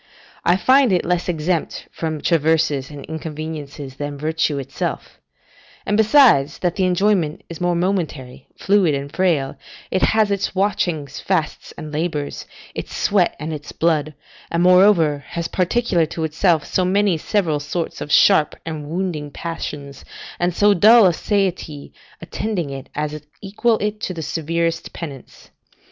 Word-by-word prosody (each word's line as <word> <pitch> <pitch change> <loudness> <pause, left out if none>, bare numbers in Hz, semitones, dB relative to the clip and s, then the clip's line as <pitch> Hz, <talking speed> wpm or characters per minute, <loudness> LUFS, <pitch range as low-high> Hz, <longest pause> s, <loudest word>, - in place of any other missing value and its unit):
I 175 - +4
find 260 +4 +4
it 180 - +1
less 180 +1 -1
exempt 165 0 -2
from 155 -2 -4
traverses 160 -4 +1
and 145 -2 -9
inconveniences 150 -3 -7
than 145 0 -5
virtue 155 0 -1
itself; 135 - -5 0.7
and, 205 - 0
besides 215 - +5
that 175 -2 0
the 190 - +1
enjoyment 180 -3 +1
is 170 -1 -8
more 175 0 +1
momentary, 170 -8 -3
fluid, 195 -7 +2
and 140 +1 -6
frail, 165 -8 +1 0.3
it 185 - 0
has 220 -2 +3
its 200 0 -1
watchings, 175 -7 -1
fasts, - - -2
and 155 - -7
labours, 150 -2 -3 0.3
its - - -6
sweat 195 -4 +2
and 155 +1 -4
its 150 -1 -7
blood; 155 -2 0 0.3
and, 170 +1 0
moreover, 180 -6 +5
has 170 -1 -4
particular 185 -3 +1
to 160 +1 -5
itself 160 0 +1
so 185 - 0
many 195 0 +2
several 160 -2 0
sorts 160 +3 -4
of 150 - -5
sharp 155 -5 +5
and 155 -3 -5
wounding 165 -4 -3
passions, 145 -3 -6 0.4
and 175 0 0
so 205 +2 +5
dull 215 +4 +7
a 180 - +4
satiety 180 -7 -2 0.3
attending 175 -4 -3
it, 135 -1 -8
as 150 0 -3 0.2
equal 215 +3 0
it 210 0 -3
to 185 - -3
the 160 - -5
severest 165 +2 -2
penance. 140 -6 -10
165 Hz, 150 wpm, -20 LUFS, 150-190 Hz, 0.7 s, dull